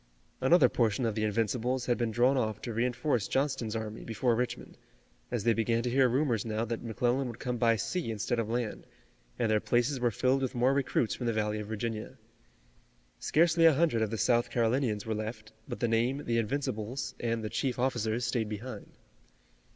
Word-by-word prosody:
Another 135 +1 +6
portion 120 0 +1
of 115 - 0
the 110 0 -2
Invincibles 115 +4 0
had 120 - +2
been 120 -1 -1
drawn 120 +5 +3
off 110 -5 -1
to 120 - -4
reinforce 120 0 0
Johnston's 130 -5 -1
army 110 -1 -5
before 115 +2 0
Richmond, 125 +2 -3 0.5
as 120 -4 -2
they 115 - +4
began 115 +1 +1
to 120 - -1
hear 130 0 +4
rumors 125 -4 +1
now 110 0 -2
that 115 0 -4
McClellan 120 +3 0
would 120 -2 -7
come 125 -1 -3
by 115 -1 +3
sea 115 +7 -2
instead 110 +2 -1
of 110 -1 -2
land, 120 -2 -3 0.5
and 115 -2 +1
their 110 - +3
places 120 +5 +1
were 120 -1 +2
filled 130 +5 +1
with 130 -2 -2
more 125 +3 +3
recruits 135 -4 +1
from 120 - -4
the 115 - +1
valley 105 0 -1
of 105 - -6
Virginia. 110 0 -4 1.0
Scarcely 165 +1 +3
a 160 -3 +7
hundred 150 -7 +2
of 110 - +1
the 115 - -3
South 120 +1 +2
Carolinians 115 -2 0
were 110 - -1
left, 110 0 -5 0.2
but - - -5
the 120 - +2
name, 120 +5 +1
"The 115 -1 +1
Invincibles" 115 0 -3
and 115 -1 -1
the 110 - -3
chief 130 -3 -1
officers, 120 -2 0
stayed 110 -1 -1
behind. 110 +5 -7
120 Hz, 195 wpm, -30 LUFS, 110-125 Hz, 1.0 s, a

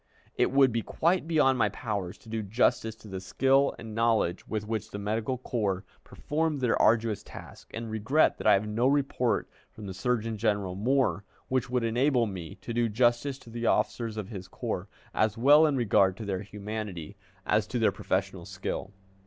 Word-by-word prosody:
It - - +2
would 135 -1 +5
be 115 0 0
quite 170 +8 0
beyond 145 -6 +3
my 105 -2 +3
power 100 -4 -3
to - - -18
do 110 0 -3
justice 110 +2 +1
to 110 -1 -15
the 95 -2 -5
skill 135 +8 +2
and 110 -1 -8
knowledge 115 -6 +1
with 105 -1 -3
which 110 -3 -3
the - - -6
medical 110 +5 -2
corps 105 -6 -2 0.2
performed 155 -1 -2
their 125 -3 +2
arduous 110 -1 +3
task, - - -12
and 115 0 -5
regret 110 +9 +2
that - - -1
I - - +8
have 100 +2 +2
no 115 +4 +1
report 135 -3 +1 0.2
from 110 - -11
the 95 - -5
Surgeon 115 +2 -1
General, 100 -4 0
Moore, 120 +1 +1 0.3
which 130 -2 0
would 125 -1 0
enable 120 +2 +2
me 90 -6 -6
to 120 - -5
do 120 0 +1
justice 120 +4 +1
to 115 - -15
the 115 0 -2
officers 110 +1 0
of 105 -2 -5
his 95 -5 -7
corps, - - -4 0.3
as 110 0 +1
well 145 +6 +6
in 145 - +1
regard 100 -6 +3
to 110 - -6
their 95 -2 -2
humanity 105 -5 -6 0.3
as - - +2
to - - -3
their - - +3
professional 95 -1 -2
skill. 95 0 -4
110 Hz, 190 wpm, -28 LUFS, 100-125 Hz, 0.3 s, I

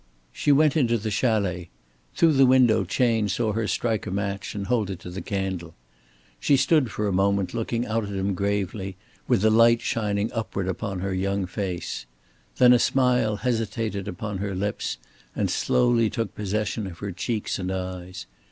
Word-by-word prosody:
She 145 - +1
went 150 +1 +4
into 120 -6 +2
the 110 0 -4
chalet. 100 -6 0 0.5
Through 165 -2 +4
the 135 -1 +5
window 125 -6 +5
Chayne 110 +2 +1
saw 110 +2 0
her 110 0 -1
strike 110 +3 -1
a - - -2
match 100 +1 -3
and 100 -1 -3
hold 110 -3 0
it 95 - -4
to 90 - -8
the 95 +2 -5
candle. 95 -4 -4 0.6
She 140 - +3
stood 145 -3 +3
for 105 0 -2
a 100 - 0
moment 95 -1 +1
looking 115 +1 -2
out 110 -1 -1
at - - -7
him 100 0 -1
gravely, 100 0 -2 0.3
with 120 -6 +2
the 110 - +5
light 115 +1 +5
shining 105 -2 -1
upward 105 -4 -3
upon 95 0 -3
her 95 0 -2
young 100 +1 -1
face. 90 - -4 0.5
Then 125 -1 +7
a 120 - +5
smile 125 -4 +2
hesitated 110 -3 -2
upon 100 +2 -4
her 100 -1 -3
lips 100 -8 -2 0.4
and - - 0
slowly 120 -3 +2
took 115 -2 -3
possession 105 0 -2
of 85 -3 -9
her 100 +1 -5
cheeks 105 +4 -3
and 90 0 -3
eyes. 90 0 -5
105 Hz, 180 wpm, -25 LUFS, 95-115 Hz, 0.6 s, Then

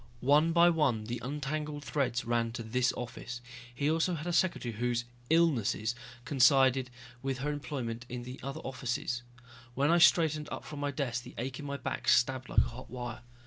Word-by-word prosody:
One 150 +5 +4
by 170 +1 +6
one 140 -9 +1
the 120 +2 -4
untangled 145 +2 -3
threads 135 -5 -1
ran 115 -1 0
to 120 -1 -5
this 120 +2 +1
office. 125 0 -6 0.3
He 140 +4 -1
also 165 +3 +2
had 155 0 -6
a 175 - -1
secretary 165 -10 +1
whose 120 +1 -1 0.2
"illnesses" 130 -9 +2 0.3
coincided 130 -1 +4 0.3
with 135 0 -2
her 145 +3 -2
employment 125 -5 -4
in 120 0 -5 0.2
other 140 +4 -5
offices. 125 -2 -3 0.5
When 140 +4 +3
I 170 - +5
straightened 155 -1 +4
up - - -5
from 150 - -7
my 145 0 -1
desk 130 -4 -2
the - - -12
ache 130 +3 -4
in 145 - -7
my 140 0 -3
back 125 -2 -4
stabbed 130 +2 +3
like - - +5
a - - -7
hot 130 +2 -10
wire. 120 -2 -6
130 Hz, 185 wpm, -31 LUFS, 120-150 Hz, 0.5 s, by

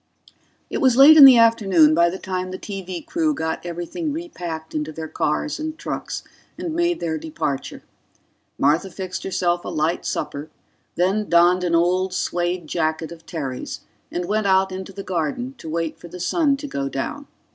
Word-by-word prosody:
It - - -1
was 255 -2 +4
late 285 +4 +9
in 295 -3 +11
the 260 -3 +9
afternoon 195 -9 +5
by 170 +2 +4
the 185 - -5
time 185 -1 -4
the 185 - -5
TV 185 -4 -6
crew 310 -2 0
got 160 -6 -3
everything 175 - -4
repacked 175 - -6
into 155 0 -3
their 160 +1 -6
cars 225 - -1
and 315 0 -4
trucks - - -5 0.3
and 335 -3 -4
made 345 +1 +1
their 160 -2 -2
departure. 150 -3 -4 0.7
Martha 155 +7 +2
fixed 185 -1 -6
herself 175 -2 0
a - - -5
light 160 0 -1
supper, 145 +2 -4 0.5
then 195 +4 0
donned 175 +1 +4
an 170 -1 +1
old 180 +2 +1
suede 175 0 -1
jacket 160 0 -2
of 165 -1 -12
Terry's 135 -6 -5 0.3
and 175 0 -3
went 210 +2 0
out 190 0 +3
into 190 +1 -6
the 195 +1 -8
garden 185 - -2
to 160 - -8
wait 165 0 -3
for - - -11
the 180 +2 -10
sun 275 - +1
to 290 +1 -7
go 140 - -3
down. 285 - -4
180 Hz, 180 wpm, -22 LUFS, 160-225 Hz, 0.7 s, in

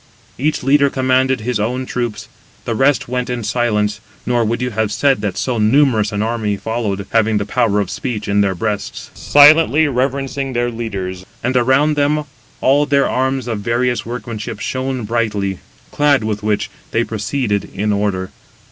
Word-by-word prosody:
Each 150 +1 0
leader 140 +1 +4
commanded 130 -1 +1
his 120 0 -1
own 125 +5 -1
troops. 115 -4 -4 0.4
The 115 - -1
rest 135 +2 +2
went 125 0 -2
in 125 -2 -3
silence 105 -2 0 0.2
(nor 120 -1 +1
would 115 +1 -1
you 125 0 -2
have 110 -1 -1
said 135 +2 +2
that 100 -3 -3
so 125 -3 -1
numerous 110 -2 +3
an 105 0 -1
army 110 -3 -1
followed, 105 -3 -3
having 110 -1 +2
the 100 - -1
power 110 -1 +1
of 100 -3 -2
speech 110 -5 -4
in 100 0 +2
their 95 -2 +1
breasts), 105 +2 -4
silently 155 +1 +5
reverencing 135 0 -2
their 120 0 0
leaders. 95 -6 -5 0.2
And 125 +2 0
around 130 +5 +3
them 150 +1 +1 0.4
all 145 +2 +3
their 140 -1 +3
arms 130 0 -1
of 115 -3 -2
various 120 +3 0
workmanship 115 -3 -6
shone 130 +1 -3
brightly; 105 -4 -1 0.3
clad 145 -4 +3
with 105 -1 -2
which, 105 -1 -1 0.2
they 115 - +1
proceeded 110 -1 -2
in 105 +2 -1
order. 100 -2 -1
120 Hz, 165 wpm, -17 LUFS, 105-130 Hz, 0.4 s, silently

